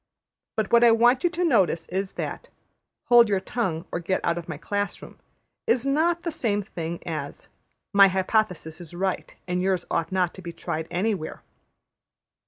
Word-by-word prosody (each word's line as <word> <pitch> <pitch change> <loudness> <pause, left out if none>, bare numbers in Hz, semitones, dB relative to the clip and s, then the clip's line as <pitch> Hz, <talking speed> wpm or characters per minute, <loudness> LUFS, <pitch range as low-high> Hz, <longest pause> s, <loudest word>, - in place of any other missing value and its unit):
But 215 -2 -1
what 235 0 +7
I 240 - +8
want 240 +3 +4
you 350 - +4
to 350 +1 -2
notice 190 - +2
is 190 +1 -2
that - - -5 0.6
``Hold 240 -1 +8
your 200 -2 +1
tongue, 185 -7 -2
or - - -2
get 180 +2 -1
out 170 - +2
of 175 0 -7
my 155 - -4
class 205 +5 -3
room,'' - - -13 0.5
is 245 +2 +2
not 330 +5 +1
the 335 - -2
same 210 -9 0
thing 170 -3 -6
as 155 -4 -6 0.5
``My 200 -1 +8
hypothesis 185 -4 -1
is 175 0 -11
right, 190 +1 -2
and 180 0 -1
yours 185 -2 0
ought 170 +1 -1
not 185 -2 +1
to 190 - -11
be 170 -2 -7
tried 160 -1 -4
anywhere.'' 190 -3 -2
190 Hz, 180 wpm, -25 LUFS, 170-230 Hz, 0.6 s, I